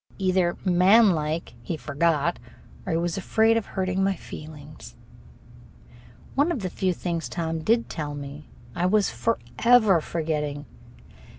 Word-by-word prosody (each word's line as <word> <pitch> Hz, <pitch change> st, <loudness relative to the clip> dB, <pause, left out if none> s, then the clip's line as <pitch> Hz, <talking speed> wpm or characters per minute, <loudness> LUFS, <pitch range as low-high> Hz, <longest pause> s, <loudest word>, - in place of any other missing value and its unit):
Either, 185 Hz, -2 st, +1 dB
manlike, 180 Hz, -4 st, +3 dB
he 155 Hz, +7 st, -4 dB
forgot, 150 Hz, +4 st, 0 dB, 0.5 s
or 180 Hz, -, 0 dB
he -, -, +2 dB
was 170 Hz, +1 st, -1 dB
afraid 220 Hz, +4 st, +2 dB
of 225 Hz, -3 st, -1 dB
hurting 190 Hz, 0 st, -1 dB
my 195 Hz, 0 st, +1 dB
feelings. 150 Hz, -, -11 dB, 1.4 s
One 290 Hz, +5 st, +2 dB
of 275 Hz, -, -2 dB
the 185 Hz, -2 st, -3 dB
few 185 Hz, -1 st, 0 dB
things 170 Hz, -1 st, -3 dB
Tom 165 Hz, -2 st, -3 dB
did 230 Hz, +8 st, +1 dB
tell 145 Hz, -2 st, -5 dB
me 145 Hz, +1 st, -9 dB, 0.2 s
I 175 Hz, -, 0 dB
was 205 Hz, +1 st, +2 dB
forever 230 Hz, -4 st, +2 dB
forgetting. 150 Hz, -3 st, -3 dB
175 Hz, 130 wpm, -25 LUFS, 155-195 Hz, 1.4 s, manlike